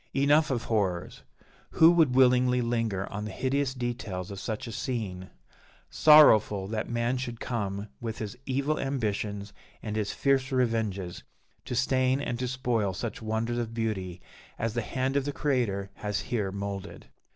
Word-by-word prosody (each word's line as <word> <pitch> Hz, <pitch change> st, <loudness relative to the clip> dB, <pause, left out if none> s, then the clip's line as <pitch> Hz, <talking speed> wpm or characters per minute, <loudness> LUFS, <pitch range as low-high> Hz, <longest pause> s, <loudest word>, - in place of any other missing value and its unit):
Enough 145 Hz, +3 st, +4 dB
of 125 Hz, -4 st, -1 dB
horrors! 95 Hz, -6 st, -1 dB, 0.5 s
Who 165 Hz, +1 st, +7 dB
would 160 Hz, -7 st, +3 dB
willingly 125 Hz, -1 st, +4 dB
linger 115 Hz, -5 st, -1 dB
on 105 Hz, +1 st, -4 dB
the 105 Hz, -, -5 dB
hideous 130 Hz, +4 st, -1 dB
details 115 Hz, -7 st, -4 dB
of 100 Hz, -, -6 dB
such 110 Hz, 0 st, -4 dB
a 115 Hz, -, -6 dB
scene? 100 Hz, -6 st, -4 dB, 0.6 s
Sorrowful 110 Hz, -10 st, +6 dB
that 110 Hz, 0 st, -3 dB
man 120 Hz, +2 st, 0 dB
should 120 Hz, -2 st, -5 dB
come, 100 Hz, -3 st, -3 dB
with 115 Hz, -1 st, -5 dB
his 105 Hz, -3 st, -5 dB
evil 140 Hz, +3 st, 0 dB
ambitions 105 Hz, -6 st, -2 dB, 0.3 s
and 105 Hz, -2 st, -4 dB
his 105 Hz, -2 st, -1 dB
fierce 135 Hz, -1 st, +1 dB
revenges, 110 Hz, -8 st, -1 dB, 0.4 s
to 125 Hz, -, -4 dB
stain 130 Hz, +1 st, +2 dB
and 120 Hz, -4 st, -3 dB
to 125 Hz, -, -1 dB
spoil 120 Hz, -6 st, 0 dB
such 115 Hz, +4 st, -5 dB
wonders 110 Hz, +2 st, -1 dB
of 115 Hz, -1 st, -4 dB
beauty 95 Hz, -6 st, -3 dB, 0.4 s
as 115 Hz, -1 st, -2 dB
the 120 Hz, -, -1 dB
hand 130 Hz, +4 st, -2 dB
of 140 Hz, -1 st, +1 dB
the 145 Hz, -, -1 dB
Creator 120 Hz, -10 st, -1 dB
has 105 Hz, -2 st, -2 dB
here 105 Hz, -5 st, -2 dB
moulded. 100 Hz, 0 st, -6 dB
115 Hz, 160 wpm, -28 LUFS, 105-130 Hz, 0.6 s, Who